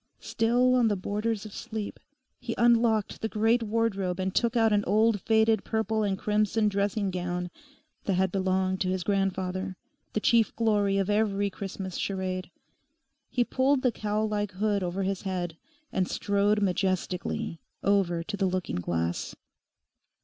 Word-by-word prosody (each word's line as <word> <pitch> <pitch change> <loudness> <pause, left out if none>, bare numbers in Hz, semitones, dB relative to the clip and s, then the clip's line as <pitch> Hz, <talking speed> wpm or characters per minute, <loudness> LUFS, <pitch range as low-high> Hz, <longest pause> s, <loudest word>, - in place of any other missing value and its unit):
Still 245 +3 +2
on 245 -2 +4
the 210 - +2
borders 210 +3 -2
of 210 - -9
sleep, 220 -2 -5 0.4
he 230 - -4
unlocked 230 -3 +3
the 220 - -1
great 225 +3 +2
wardrobe 205 -5 -1
and 190 0 -1
took 235 0 +1
out 225 -2 +4
an 205 0 +3
old 215 +1 +3
faded 220 0 +3
purple 220 0 0
and 200 -2 0
crimson 210 +1 +1
dressing 200 0 0
gown 180 0 -3 0.5
that 195 - +1
had 190 0 +1
belonged 190 0 0
to 185 - +1
his 185 -1 -1
grandfather, 190 -1 -1 0.4
the - - +1
chief 230 +1 +3
glory 205 -3 +2
of 195 -1 +1
every 205 -1 +1
Christmas 190 -1 -6
charade. 185 -1 -3 0.8
He 245 - +2
pulled 260 +2 +1
the 250 - +3
cowl 215 0 -1
like 205 -2 -2
hood 205 +1 0
over 185 +2 -2
his 195 0 -1
head 180 -4 -3 0.4
and 185 -1 +1
strode 205 +1 +1
majestically 185 -3 -1 0.2
over 185 -4 +2
to 205 +5 -4
the 195 -1 +1
looking 185 - -2
glass. 85 -1 -2
200 Hz, 155 wpm, -28 LUFS, 185-220 Hz, 0.8 s, on